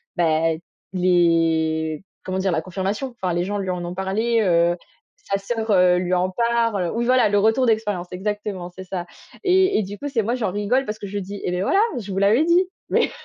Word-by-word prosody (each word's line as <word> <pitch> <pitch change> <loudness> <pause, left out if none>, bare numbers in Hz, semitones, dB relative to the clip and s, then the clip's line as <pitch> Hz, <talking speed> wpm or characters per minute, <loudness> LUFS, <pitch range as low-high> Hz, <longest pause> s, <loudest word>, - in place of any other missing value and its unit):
bah, 165 -1 +2 0.4
les 165 -3 +2 0.2
comment 185 0 -2
dire? 190 -1 +1
La 160 - 0
confirmation. 200 +7 -3
Enfin, 185 -2 0
les 175 +1 0
gens 205 +2 -2
lui 190 - -3
en 180 -1 -2
ont 175 - -5
parlé, 220 +5 0
heu, 170 -2 +3 0.5
sa 195 - +2
sœur, 225 +2 -2
heu, 180 -2 +5
lui 180 0 -1
en 180 +1 +2
parle. 230 -4 +1
Oui, 235 - 0
voilà, 250 -1 +4
le 205 - +2
retour 225 +5 +3
d'expérience, 210 -5 0
exactement, 200 -1 -4
c'est 185 +1 -10
ça. 180 -1 -4 0.4
Et 375 0 +3
et - - 0
du 200 +2 -7
coup, 290 - -4
c'est 265 -5 0
moi, 235 +4 0
j'en 220 -7 -1
rigole 210 +7 0
parce 215 -2 -5
que 200 - -6
je 205 +1 -3
dis: 200 +1 -7
«Et 180 - -1
beh 180 +1 -1
voilà 390 - +3 0.2
je 205 -3 -8
vous 190 - -4
l'avais 220 +10 +4
dit». 350 +2 +4 0.2
Mais - - +2
195 Hz, 215 wpm, -22 LUFS, 180-225 Hz, 0.5 s, heu